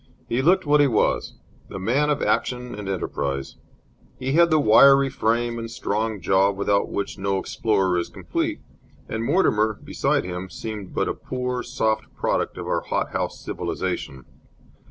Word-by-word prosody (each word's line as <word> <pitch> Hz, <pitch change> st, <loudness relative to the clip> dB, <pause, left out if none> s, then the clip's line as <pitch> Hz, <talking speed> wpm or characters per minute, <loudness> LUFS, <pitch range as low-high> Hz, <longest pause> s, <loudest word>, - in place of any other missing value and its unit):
He 120 Hz, +3 st, 0 dB
looked 180 Hz, +5 st, +3 dB
what 145 Hz, 0 st, +4 dB
he 145 Hz, -, +5 dB
was, 115 Hz, -5 st, 0 dB, 0.3 s
the -, -, -6 dB
man 130 Hz, +10 st, +1 dB
of 145 Hz, -, 0 dB
action 125 Hz, 0 st, -1 dB
and 105 Hz, -2 st, -6 dB
enterprise. 70 Hz, -7 st, -3 dB, 0.6 s
He 130 Hz, +1 st, -3 dB
had 170 Hz, +2 st, +5 dB
the 155 Hz, -1 st, +4 dB
wiry 135 Hz, +3 st, +6 dB
frame 120 Hz, -1 st, 0 dB
and 115 Hz, 0 st, -5 dB
strong 110 Hz, -1 st, -2 dB
jaw 95 Hz, +3 st, +3 dB
without 100 Hz, 0 st, 0 dB
which 100 Hz, 0 st, -4 dB
no 100 Hz, 0 st, 0 dB
explorer 95 Hz, -3 st, 0 dB
is 85 Hz, -, -3 dB
complete, -, -, -3 dB, 0.5 s
and 110 Hz, 0 st, -3 dB
Mortimer, 110 Hz, -, +2 dB
beside -, -, 0 dB
him, 90 Hz, +1 st, -5 dB
seemed 105 Hz, -3 st, -7 dB
but -, -, +1 dB
a -, -, -1 dB
poor, 125 Hz, -1 st, -3 dB
soft 110 Hz, -3 st, -1 dB
product -, -, -1 dB
of -, -, -5 dB
our -, -, 0 dB
hot -, -, -2 dB
house -, -, -3 dB
civilization. 65 Hz, -2 st, -4 dB
110 Hz, 160 wpm, -23 LUFS, 100-130 Hz, 0.6 s, wiry